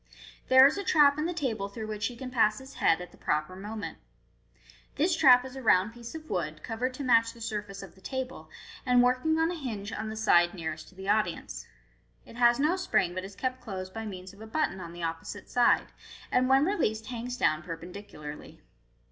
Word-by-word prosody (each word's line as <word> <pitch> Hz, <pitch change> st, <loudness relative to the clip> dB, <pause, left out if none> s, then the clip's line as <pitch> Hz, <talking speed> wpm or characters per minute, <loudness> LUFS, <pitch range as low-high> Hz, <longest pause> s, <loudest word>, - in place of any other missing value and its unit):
There 260 Hz, +1 st, +8 dB
is 300 Hz, +8 st, +3 dB
a -, -, -3 dB
trap 295 Hz, -5 st, +5 dB
in 310 Hz, -, 0 dB
the -, -, -2 dB
table 225 Hz, -, -2 dB
through 220 Hz, +2 st, -6 dB
which 215 Hz, 0 st, -2 dB
he 245 Hz, -, -7 dB
can 255 Hz, +1 st, -7 dB
pass 215 Hz, -3 st, +3 dB
his 265 Hz, +1 st, -11 dB
head 165 Hz, +2 st, +4 dB
at 180 Hz, -, -9 dB
the -, -, -19 dB
proper 155 Hz, +4 st, -1 dB
moment. 210 Hz, +2 st, -6 dB, 1.0 s
This 325 Hz, +4 st, +2 dB
trap 250 Hz, -5 st, +6 dB
is 260 Hz, 0 st, -9 dB
a 265 Hz, -, -6 dB
round 210 Hz, -2 st, +3 dB
piece 235 Hz, +3 st, -9 dB
of 315 Hz, -1 st, -8 dB
wood, 155 Hz, -4 st, -3 dB
covered 250 Hz, +3 st, -3 dB
to 280 Hz, -, -5 dB
match 230 Hz, -3 st, +4 dB
the 235 Hz, -, -15 dB
surface 210 Hz, -3 st, -5 dB
of 195 Hz, -, -11 dB
the 190 Hz, -, -21 dB
table, 260 Hz, +4 st, -5 dB, 0.3 s
and 250 Hz, -2 st, +4 dB
working 255 Hz, +6 st, +2 dB
on 325 Hz, +1 st, +2 dB
a -, -, -3 dB
hinge 225 Hz, -9 st, -5 dB
on 215 Hz, +1 st, -4 dB
the 220 Hz, -, -5 dB
side 175 Hz, -5 st, +4 dB
nearest 160 Hz, -2 st, -5 dB
to -, -, -21 dB
the 190 Hz, +1 st, -8 dB
audience. 205 Hz, -4 st, -1 dB, 0.6 s
It 230 Hz, -, -13 dB
has 240 Hz, -1 st, +5 dB
no 310 Hz, +6 st, +2 dB
spring, 190 Hz, -, +1 dB
but 185 Hz, +1 st, -4 dB
is 195 Hz, +1 st, -9 dB
kept 255 Hz, +2 st, -3 dB
closed 185 Hz, -4 st, -6 dB
by 225 Hz, 0 st, -5 dB
means 185 Hz, -1 st, -8 dB
of 200 Hz, -, -16 dB
a 220 Hz, -, -8 dB
button 220 Hz, -6 st, -1 dB
on 170 Hz, -1 st, -7 dB
the 175 Hz, 0 st, -8 dB
opposite 165 Hz, 0 st, -5 dB
side, 245 Hz, -1 st, +3 dB, 0.4 s
and 255 Hz, +1 st, +3 dB
when 270 Hz, +2 st, +5 dB
released 220 Hz, -, 0 dB
hangs 245 Hz, +2 st, -5 dB
down 155 Hz, -10 st, +2 dB
perpendicularly. 165 Hz, -3 st, -9 dB
220 Hz, 215 wpm, -29 LUFS, 190-255 Hz, 1.0 s, There